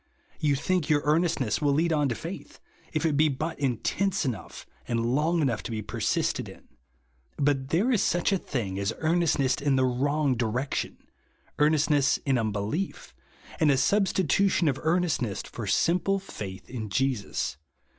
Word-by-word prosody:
You 145 -2 +2
think 170 +3 0
your 145 -2 +3
earnestness 155 - +1
will 145 -1 +3
lead 165 +3 +2
on 145 -3 +2
to 120 - -1
faith, - - -8 0.3
if 155 +1 -1
it 155 -3 +2
be 155 +2 +4
but 155 +4 -3
intense 150 - 0
enouofh, 120 -7 -5 0.2
and 115 0 0
lon;.^ 160 +3 +2
enousfh 115 -4 -2
persisted - - -1
in. - - -14 0.7
But 135 -2 +1
there 195 - +2
is 225 - +3
such 175 +3 +1
a 195 - +2
thins^ 100 - -3
as 100 +2 -1
earnestness 155 -5 +2
in 140 -1 +1
the 130 0 +3
wrong 140 +3 +1
direction; 120 +4 -2 0.6
earnestness 150 -2 +3
in 135 -3 +2
un 110 -1 0
belief, 105 - -3 0.5
and 155 -3 +4
a 135 - +4
substitution 190 +2 +2
of 135 -2 +1
earnestness 160 - 0
for 115 -4 -7
simple 180 - +2
faith 100 - -8
in 115 -4 -5
Jesus. 105 - -1
145 Hz, 155 wpm, -27 LUFS, 120-165 Hz, 0.7 s, be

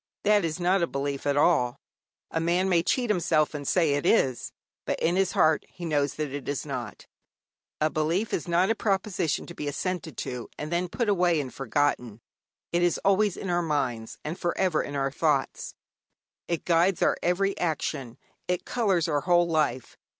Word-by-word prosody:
That 210 -1 +4
is 165 +1 -2
not 180 +2 +2
a 170 - +2
belief 140 -1 -3
at 145 0 +1
all. 130 -6 +3 0.6
A 165 - 0
man 175 +3 +1
may 175 -3 +3
cheat 240 +6 +1
himself, 155 -5 +2
and 145 -2 -5
say 165 -5 +3
it 145 - 0
is, 130 -2 +2 0.3
but - - -2
in 170 +2 +1
his 190 -1 +1
heart 155 0 +3
he 175 - -8
knows 145 -3 0
that 150 -3 -3
it 140 0 -5
is 145 - -2
not. - - -6 0.7
A 155 0 +1
belief 165 +8 0
is 165 - -2
not 175 +4 +3
a - - +1
proposition 190 -7 -1
to 170 - -9
be 150 - -5
assented 160 - -3
to, 125 -2 -5
and 150 +2 -5
then 175 +1 0
put 235 +5 -2
away 180 -5 +3
and 135 -3 -5
forgotten. 130 -4 -1 0.5
It 175 - +1
is 175 -1 +2
always 200 0 +3
in 190 - -3
our 175 0 +2
minds, 130 -8 -2
and 160 +4 -4
for 175 -1 -1
ever 185 -5 +2
in 145 - -6
our 135 -1 0
thoughts. 145 -2 -1 0.7
It 170 -2 -2
guides 175 +2 +3
our - - +3
every 195 +3 +1
action, 140 -7 -2 0.3
it 180 0 -1
colours 195 -8 +1
our 145 -3 0
whole 175 0 +3
life. 150 -7 -1
165 Hz, 190 wpm, -27 LUFS, 145-180 Hz, 0.7 s, That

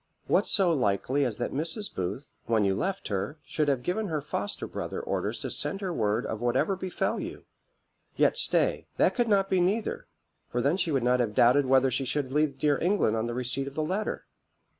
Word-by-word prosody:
What - - +2
so 185 -4 +4
likely 130 +2 +1
as 115 -4 -2
that 120 - -3
Mrs. 165 +9 -2
Booth, 100 +10 -4
when 110 -3 +2
you 95 - +2
left 190 - -2
her, 100 +8 -2
should 150 -2 -1
have 135 -3 +1
given 205 - -1
her 160 -4 -1
foster 185 +7 -4
brother - - -5
orders - - -2
to - - -3
send 195 - 0
her 185 -3 -2
word 110 -3 0
of 110 - -4
whatever 120 +11 +1
befel 185 -1 -2
you? - - -7 0.7
Yet - - +3
stay - - +2
that - - +3
could 240 -2 +1
not 200 -3 +3
be 185 -2 +2
neither; 205 +5 -1 0.4
for 120 - -2
then 140 +8 +2
she 175 - 0
would 135 -4 +1
not 125 +1 +3
have 110 -4 -1
doubted 130 +3 +5
whether 135 0 +4
she 130 +2 -1
should 130 0 -2
leave 150 -1 +1
dear 145 0 +2
England 175 - +2
on 110 +1 -1
the 120 - -4
receipt 125 +2 -1
of 140 - -8
the 155 - 0
letter. 190 +7 -2
140 Hz, 210 wpm, -28 LUFS, 120-180 Hz, 0.7 s, doubted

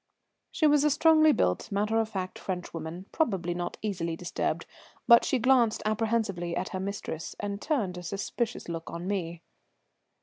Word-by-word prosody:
She 315 - 0
was 295 -1 +5
a 300 - +4
strongly 315 +1 +5
built, 90 - 0
matter 210 +3 +1
of 220 -1 0
fact 185 -3 -4
French 180 -2 -5
woman, 165 +3 -6
probably 190 - 0
not 175 0 -4
easily 170 -6 -2
disturbed; 175 +1 -2 0.4
but 235 -1 +8
she 265 - +1
glanced 240 -2 +3
apprehensively 215 -5 0
at 185 +1 -2
her 185 - -4
mistress, 190 -4 -5
and 200 0 -4
turned 210 - -1
a - - -8
suspicious 200 +6 -3
look 165 -1 -5
on 170 +1 -6
me. 170 -4 -3
200 Hz, 165 wpm, -28 LUFS, 175-230 Hz, 0.4 s, but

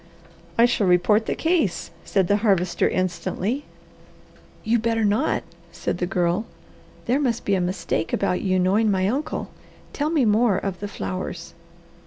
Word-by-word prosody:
"I 230 - +7
shall 230 -5 +1
report 180 +5 +3
the - - 0
case," 320 - 0
said 190 -3 +1
the 205 - +3
Harvester 195 -5 +2
instantly. 190 +7 -2 1.0
"You 230 +1 +2
better 225 -1 +1
not!" 210 +9 +1 0.3
said - - -3
the 180 - 0
Girl. 180 +3 0 0.6
"There 255 +4 +2
must 245 -5 -1
be 200 - +1
a 190 - +2
mistake 175 -2 -2
about 180 - 0
you 185 -1 +1
knowing 195 +4 +3
my 190 -1 +1
uncle. 270 +8 -2 0.4
Tell 295 +1 -1
me 310 -6 +2
more 215 -1 +3
of 195 -2 -3
the 205 - -4
flowers." 95 - -5
205 Hz, 155 wpm, -23 LUFS, 185-230 Hz, 1.0 s, I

